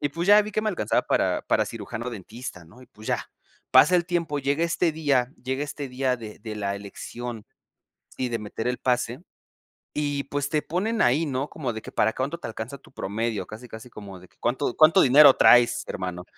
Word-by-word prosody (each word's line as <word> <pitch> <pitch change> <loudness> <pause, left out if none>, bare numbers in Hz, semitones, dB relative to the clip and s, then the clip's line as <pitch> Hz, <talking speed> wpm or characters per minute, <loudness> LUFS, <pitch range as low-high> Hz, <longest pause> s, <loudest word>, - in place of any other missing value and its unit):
Y, 145 - 0
pues, 170 +4 -4
ya 210 +1 +8
vi 210 0 -4
que 215 - 0
me 215 - 0
alcanzaba 190 - 0
para - - 0
para - - +1
cirujano 115 +2 -6
dentista, 110 -2 -8
¿no? 100 +10 -18
Y, 125 - -16
pues, 110 -3 -15
ya - - -1 0.4
pasa 180 - +6
el 170 -1 0
tiempo. 170 -5 -1
Llega 140 +4 0
este 170 0 +1
día, 140 -5 +1
llega 130 +2 -2
este 145 -1 -6
día 130 0 0
de 110 -3 -10
de 110 0 -7
la 100 -1 -2
elección 110 +3 -7 0.7
y 130 - -1
de 115 - -2
meter 105 +2 -4
el 125 - -2
pase. 125 0 -1 0.7
Y, 145 -1 -1
pues, 140 0 -3
te 150 0 0
ponen 210 +7 -2
ahí, 140 +7 +3
¿no? 135 0 -2
Como 130 -7 -4
de 110 - -7
que - - -9
para 110 +1 +2
cuánto 140 +6 -3
te - - -7
alcanza 115 +5 -6
tu 135 - -21
promedio. 110 +1 -3
Casi, 110 +4 -10
casi 110 +2 -10
como 100 -4 -10
de 90 - -16
que, - - -33
¿cuánto 125 +2 -1
cuánto 155 +1 +6
dinero 140 +1 +8
traes, 120 -1 +5
hermano? 90 -1 -5
125 Hz, 210 wpm, -25 LUFS, 110-145 Hz, 0.7 s, ya